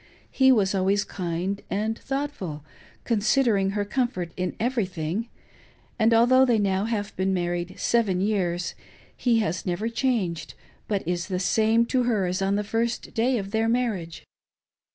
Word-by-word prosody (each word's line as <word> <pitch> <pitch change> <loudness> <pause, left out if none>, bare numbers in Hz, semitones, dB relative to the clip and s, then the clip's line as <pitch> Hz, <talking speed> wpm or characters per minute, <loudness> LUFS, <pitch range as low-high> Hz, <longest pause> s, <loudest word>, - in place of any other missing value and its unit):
He 265 -1 +5
was 205 -6 +3
always 195 +1 +2
kind 180 +2 -3
and 215 +3 -1
thoughtful, 265 - -4 0.4
considering 220 -3 +2
her 205 - 0
comfort 205 -8 -2
in 185 0 -3
everything; 210 -4 -2 0.7
and 220 +1 +4
although 245 +3 +6
they 245 -3 +3
have 210 - +1 0.3
now 215 -3 0
been 190 +1 0
married 175 +1 -2
seven 215 -6 +1
years, 180 -3 0 0.4
he 235 -3 +2
has 185 -4 -2
never 190 +5 -2
changed, 215 -10 -1 0.3
but 200 -5 -2
is 175 0 -1
the 185 -2 -2
same 220 +4 +3
to 255 +1 +1
her 215 -6 +1
as 180 +2 -2
on 195 +1 +1
the 210 - 0
first 230 +3 -2
day 245 +3 +2
of 195 -2 -5
their 225 +1 +1
marriage. 220 -9 -1
205 Hz, 155 wpm, -25 LUFS, 185-230 Hz, 0.7 s, although